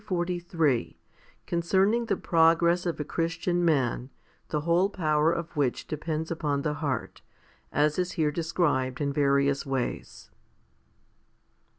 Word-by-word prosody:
HOMILY 175 -1 -1
XLIII 155 - 0 0.5
Concerning 190 +7 +1
the - - 0
progress 170 +1 +3
of 170 - -2
a - - -1
Christian 165 +3 -1
man, 130 -6 +1 0.4
the 150 - -1
whole 170 +5 +2
power 155 -4 +1
of 170 0 -4
which 140 -4 0
depends 155 +1 -4
upon 150 -4 -1
the 150 - 0
heart, 145 -5 -3 0.5
as 150 +3 +1
is 180 0 -1
here 155 -2 +1
described 150 -6 0
in 140 -1 -1
various 140 -1 +2
ways. 135 -3 -4
160 Hz, 125 wpm, -27 LUFS, 145-170 Hz, 0.5 s, progress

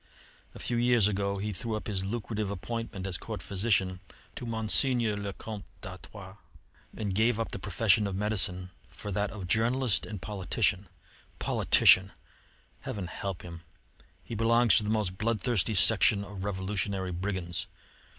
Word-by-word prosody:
A - - -8
few 120 - 0
years 120 -3 +4
ago 100 -1 -1
he 105 +1 -3
threw 110 +4 -3
up 110 - -5
his 95 -3 -2
lucrative 105 0 -3
appointment 100 +1 -5
as 95 -3 -3
Court - - -6
physician 95 -2 0 0.4
to 120 - -6
Monseigneur 115 0 +3
le 100 -1 -4
Comte 105 0 -8 0.2
d'Artois, 95 0 -10 0.6
and 105 -3 -2
gave 110 +3 +2
up 115 - -2
the - - -5
profession 105 +2 +2
of 95 - -4
medicine 95 -3 0 0.2
for 105 - -8
that 100 +1 0
of 100 -4 -7
journalist 115 +4 +1
and 105 -3 -6
politician. 100 0 -1 0.5
Politician! 95 0 +5 0.7
Heaven 100 -4 -5
help 95 +1 -5
him! 85 -1 -9 0.6
He - - -8
belongs 115 +1 +4
to - - +2
the 105 - -3
most 105 -4 -1
bloodthirsty 110 -1 0
section 100 0 +6
of 100 -1 -8
revolutionary 95 -1 -2
brigands. 90 -1 -3
105 Hz, 150 wpm, -29 LUFS, 95-110 Hz, 0.7 s, section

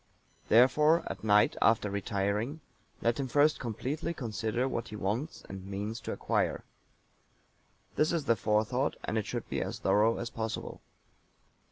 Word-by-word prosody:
Therefore 150 +8 +5
at - - -6
night, 105 -1 +4
after 110 -2 +3
retiring, 100 +7 -1 0.4
let 115 +2 +1
him 135 - -1
first 145 +4 +3
completely 130 +8 -3
consider 115 0 -2
what 120 -3 -3
he 105 - -8
wants 105 - -3
and 95 -1 -8
means 100 +4 -4
to - - -5
acquire. - - -1 1.3
This 155 - +3
is 165 -4 -1
the 115 - +4
Forethought, 110 +6 +1
and - - -3
it 110 -2 -1
should - - -4
be - - -2
as - - -3
thorough 105 +4 +3
as 120 - -4
possible. 110 -1 -5
115 Hz, 150 wpm, -30 LUFS, 105-135 Hz, 1.3 s, Therefore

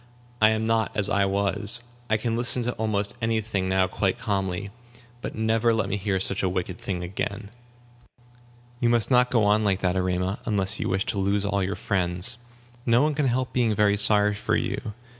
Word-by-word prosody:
I 110 - +7
am 110 0 0
not 115 -1 +1
as 105 0 0
I 100 -1 +2
was. 100 +4 +2 0.3
I 110 - +3
can 115 +1 -2
listen 120 +1 +1
to 120 - -1
almost 105 -2 -1
any 115 0 +1
thing 100 -4 -2
now 95 0 +3
quite 95 +1 -1
calmly. 95 -1 -2 0.5
But - - -6
never 110 +1 +1
let 105 -3 -1
me 100 - -1
hear 100 -1 -1
such 95 +1 0
a 95 - +1
wicked 90 0 -4
thing 90 -2 -4
again." 105 +2 -5 1.3
"You 120 -2 +2
must 120 +1 +2
not 125 0 +4
go 115 -4 +2
on 105 +1 +3
like 100 -2 0
that, 90 -1 0
Erema, 90 +1 -1
unless 100 -4 +1
you - - -2
wish 95 +1 0
to 100 - -2
lose 100 +1 0
all 100 -1 0
your 95 +2 -2
friends. 95 +3 -1 0.4
No 120 +2 +3
one 155 0 +1
can 145 -1 0
help 125 +1 -1
being 115 -4 +1 0.2
sorry 105 0 +4
for 105 - -1
you. 105 - -3
105 Hz, 195 wpm, -25 LUFS, 95-115 Hz, 1.3 s, I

